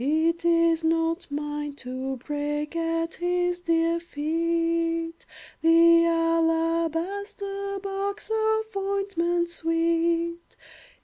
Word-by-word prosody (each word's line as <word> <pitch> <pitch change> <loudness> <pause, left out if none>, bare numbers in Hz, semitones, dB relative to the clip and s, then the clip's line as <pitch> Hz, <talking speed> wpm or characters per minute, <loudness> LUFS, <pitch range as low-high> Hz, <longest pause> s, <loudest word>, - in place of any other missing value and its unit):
It 320 +4 +1
is 335 -1 +3
not 330 +2 0
mine 295 0 -4
to 260 0 -5
break 295 +3 -3
At 330 0 -1
his 355 0 0
dear 335 -1 +1
feet 330 +1 -1 0.3
The 335 +1 +6
alabaster 335 +5 0
box 395 +2 -3
Of 440 0 0
ointment 390 -3 0
sweet. 335 +1 0
335 Hz, 85 wpm, -26 LUFS, 330-350 Hz, 0.3 s, The